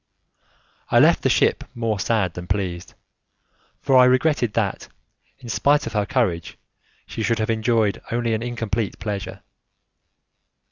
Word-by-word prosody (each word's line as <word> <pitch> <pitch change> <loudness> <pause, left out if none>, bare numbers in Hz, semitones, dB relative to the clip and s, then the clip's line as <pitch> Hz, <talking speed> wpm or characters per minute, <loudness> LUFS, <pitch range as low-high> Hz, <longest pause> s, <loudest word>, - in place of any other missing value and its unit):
I - - +3
left - - +5
the - - +1
ship - - +2
more 115 -3 -2
sad 100 -4 0
than 90 0 -8
pleased, 90 -3 -3 0.9
for 135 - +2
I 125 - +7
regretted 130 -3 +2
that, 105 -4 -2 0.5
in 125 - -13
spite 140 +8 +2
of - - -6
her 105 -2 0
courage, 85 -2 -1 0.5
she - - -6
should 115 +1 +1
have 110 +1 -1
enjoyed 110 -2 +1
only 120 -1 0
an 110 - -1
incomplete 115 -3 -3
pleasure. 100 -2 -5
110 Hz, 140 wpm, -22 LUFS, 100-120 Hz, 0.9 s, I